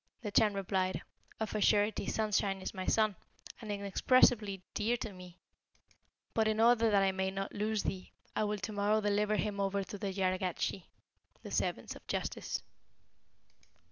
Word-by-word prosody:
The 210 - -3
Chan 210 -1 +4
replied, 190 -1 -1 0.4
'Of 220 -1 -2
a 215 - -1
surety 205 +1 +3
Sunshine 205 -2 0
is 190 - -5
my 185 -1 -5
son, 215 -2 +3 0.5
and 215 -2 -5
inexpressibly 200 0 +3
dear 220 +2 +1
unto 220 -3 -5
me; 180 -1 -12 1.0
but 220 -1 +2
in 220 0 +1
order 230 0 +5
that 200 -2 +4
I 195 - +3
may 190 0 -1
not 195 0 -4
lose 215 +1 -1
thee, 185 -1 -4 0.2
I 215 - +1
will 210 0 -1
to 200 +2 -5
morrow 205 +1 +2
deliver 210 0 +1
him 210 -1 -1
over 195 0 0
to 200 +1 -8
the 195 0 -2
Jargatschi' 185 -1 -1 0.6
(the - - -8
servants - - -1
of - - -14
Justice). - - -3
205 Hz, 165 wpm, -33 LUFS, 195-215 Hz, 1.0 s, order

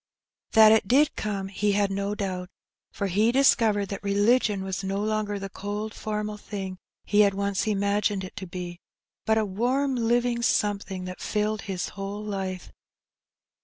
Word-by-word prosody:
That 220 -1 +8
it 220 -3 +4
did 290 +6 +4
come 200 -2 -3
he 205 +1 0
had 200 -1 +1
no 200 +1 -2
doubt, 185 -3 -3 0.4
for 200 - -3
he 205 +5 +2
discovered 225 -6 +3
that 200 - -5
religion 205 0 +2
was 190 0 -4
no 195 +1 -2
longer 210 0 -1
the 195 0 -5
cold 205 +3 -5
formal 210 0 -3
thing 195 -3 -6 0.3
he 205 - +2
had 200 -2 +5
once 200 +1 -1
imagined 200 -1 +1
it 185 - -8
to 190 - -5
be, 175 0 -6 0.5
but 220 0 +4
a 220 - +2
warm 250 +8 0
living 240 0 +1
something 200 -4 0
that 185 0 -7
filled 210 0 -1
his 185 -2 -2
whole 200 +1 -6
life. 190 -3 -4
205 Hz, 165 wpm, -26 LUFS, 195-215 Hz, 0.5 s, That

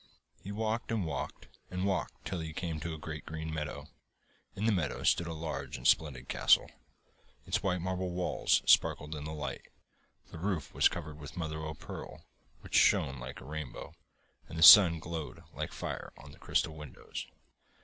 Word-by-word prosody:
He 100 - -6
walked, 110 +3 -2
and 110 -5 0
walked, 70 -2 -5 0.2
and 90 +1 -2
walked, 95 -3 -2
till 90 - -3
he 80 -1 -5
came 80 -2 -3
to 80 0 -4
a - - -8
great 80 0 -7
green 80 0 -5
meadow. 75 -1 -4 0.7
In 105 - -2
the 115 - +4
meadow 90 -8 -1
stood 85 - +3
a 85 - -4
large 80 0 -4
and - - -12
splendid 70 -5 +2
castle. - - +4 0.7
Its - - 0
white 90 -2 0
marble 95 0 -2
walls 90 0 +1
sparkled 75 +1 +4
in 75 -1 -6
the 75 - -5
light, 75 -1 -5 0.6
the 85 - -8
roof 90 -5 -2
was - - +5
covered 75 -2 -7
with 75 +2 -10
mother 80 -2 -3
o' 80 0 -5
pearl, 80 - -9 0.4
which - - -13
shone 65 -1 +4
like 65 +1 -8
a - - -11
rainbow, 75 0 -7 0.6
and 80 - -7
the 80 - +2
sun 90 -3 +11
glowed 80 -2 -6
like - - -4
fire - - -5
on 70 - -13
the - - -16
crystal 80 - 0
windows. 75 -3 -8
80 Hz, 180 wpm, -32 LUFS, 75-90 Hz, 0.7 s, sun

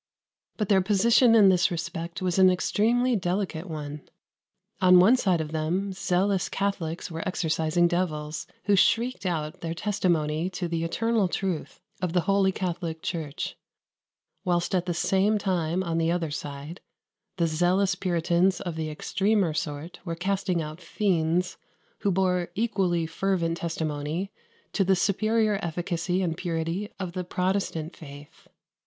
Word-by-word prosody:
But 210 - -1
their 195 -2 +5
position 225 +5 +4
in 205 -3 +7
this 180 -2 +3
respect 170 +1 -4
was 180 0 +1
an 185 0 +8
extremely 230 +7 +2
delicate 180 -2 -2
one. 150 -2 -6 0.8
On 180 -1 +7
one 205 +8 +7
side 190 -9 +1
of 155 -1 -4
them 175 +5 -1
zealous 190 0 0
Catholics 180 -5 -2
were 165 0 -4
exorcising 165 -1 +1
devils, 155 -4 -2 0.2
who 205 0 +3
shrieked 230 +2 +2
out 155 -3 -3
their 165 0 -3
testimony 170 -4 0
to 180 -1 -4
the 165 -1 -2
eternal 220 +4 +1
truth 180 -2 -3 0.2
of 180 -3 -1
the 180 - +3
Holy 195 +2 +2
Catholic 170 -3 -4
Church; 155 -4 -4 0.9
whilst 175 -1 0
at 180 -1 +1
the 175 - 0
same 195 +4 +2
time, 180 -3 0
on 165 -2 -1
the 165 0 +1
other 170 -3 -1
side, 145 +3 -6 0.6
the 170 - +2
zealous 180 +4 +2
Puritans 180 0 +1
of 175 -3 -4
the 160 -1 -3
extremer 195 +3 0
sort 150 +1 -4
were 170 -3 -4
casting 185 -1 -1
out 155 +3 -8
fiends, 175 -2 0 0.4
who 200 - 0
bore 180 -2 +1
equally 190 -7 +1
fervent 170 0 -1
testimony 160 +2 -3 0.4
to 200 - +2
the 190 +1 +3
superior 215 +2 +1
efficacy 175 +2 -1
and 165 -3 -1
purity 170 +3 -2
of 185 -3 -3
the 180 +1 -4
Protestant 180 -3 -2
faith. 145 -1 -13
180 Hz, 145 wpm, -26 LUFS, 165-195 Hz, 0.9 s, an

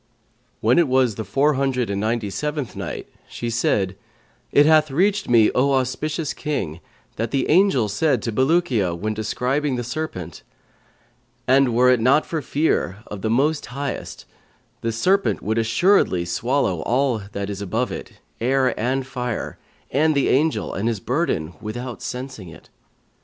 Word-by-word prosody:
When 120 +8 +4
it 170 - +4
was 130 -3 +3
the 110 - -5
Four 135 +9 +2
Hundred 130 -5 0
and 100 0 -2
Ninety 110 -1 -1
seventh 150 +1 -3
Night, - - -5 0.2
She 120 0 -4
said, 100 -5 0 0.6
It 145 - +6
hath 155 0 +5
reached 190 +7 +1
me, 115 -3 +5
O 135 +2 +2
auspicious 140 +4 -1
King, 110 - -3 0.4
that 115 +1 -1
the 135 +2 0
angel 160 - +4
said 125 +4 +1
to 115 - -2
Bulukiya 130 - +1
when 110 +5 -2
describing 125 +6 -1
the 120 - -3
serpent, 125 - -5 1.1
"'And 130 -2 +4
were 125 +1 +5
it 125 - +3
not 130 +6 +3
for 160 -2 -3
fear 120 - -1
of 105 -2 -8
the 110 - -1
Most 145 +7 +1
Highest, 140 +2 -5 0.6
this 115 -1 -2
serpent 195 +9 +1
would 110 +2 0
assuredly 115 - +2
swallow 105 - 0
up - - -6
all 125 -2 +1
that 100 0 -3
is 100 0 -6
above 110 +6 -1
it, - - -7 0.3
air 130 +1 +2
and 130 +4 0
fire, 125 -3 -4 0.3
and 155 +3 +2
the 140 - +2
Angel 155 +4 +1
and 105 +4 -2
his 115 -3 -1
burden, 120 - -1
without 120 +3 -6
sensing 125 -7 -6
it. 85 0 -15
125 Hz, 160 wpm, -22 LUFS, 110-145 Hz, 1.1 s, It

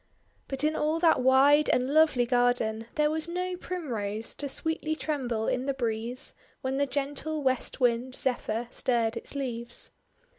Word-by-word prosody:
But 270 +1 -2
in 310 +1 +2
all 310 +2 +1
that 330 -6 +4
wide 275 +3 +5
and 255 +3 +1
lovely 305 -6 +4
garden 240 -2 +1
there 300 0 +2
was 315 +1 -2
no 360 +1 -2
Primrose 230 - -4
to 285 - -3
sweetly 315 +1 -2
tremble 250 -9 -2
in 255 +2 -1
the 275 - 0
breeze, 235 +1 -3 0.3
when 265 +1 -1
the 280 0 +1
gentle 290 +3 -3
West 260 -1 0
Wind, 245 +1 +1
Zephyr, 240 -2 0
stirred 230 -2 0
its 230 - -7
leaves. 240 -3 -4
265 Hz, 155 wpm, -28 LUFS, 240-300 Hz, 0.3 s, wide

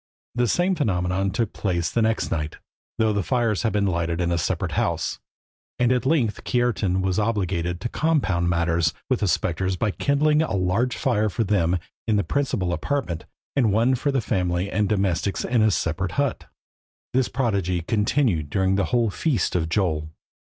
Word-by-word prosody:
The 120 0 +1
same 180 - +2
phenomenon 95 - 0
took 105 +2 -1
place 85 -4 -1
the 115 - +1
next 110 0 0
night, 75 -1 -2 0.4
though 110 -1 +2
the 100 - +1
fires 115 0 0
had 115 - +1
been 105 -1 +1
lighted 85 -2 -1
in 85 -1 0
a 85 - +1
separate - - -1
house, - - -1 0.6
and 125 0 +2
at 130 +1 +1
length 130 -9 +1
Kiartan 110 -7 +1
was 95 +1 0
obliged 90 -5 -1
to 120 - -3
compound 115 - +1
matters 85 -2 +1 0.2
with 130 - +2
the 100 - 0
spectres 95 +1 0
by 105 +3 0
kindling 150 +6 +2
a 155 -10 -1
large 100 +7 0
fire 110 -5 +1
for 115 - -1
them 90 -4 +1 0.3
in 110 - +2
the 100 - +2
principal 105 -11 -1
apartment, 85 - -2 0.3
and 120 -7 +3
one 115 +5 +3
for 130 +3 0
the 135 -2 +1
family 90 -3 -1
and 105 -2 +1
domestics 100 -2 0
in 120 -1 +2
a 110 - +5
separate 85 0 -1
hut. 140 -3 -1 0.7
This 130 -1 +2
prodigy 100 -9 0
continued 105 - +1
during 95 +3 +1
the 100 - +2
whole 120 -4 +1
feast 140 - 0
of 80 -2 0
Jol. 80 -5 0
100 Hz, 180 wpm, -24 LUFS, 90-120 Hz, 0.7 s, a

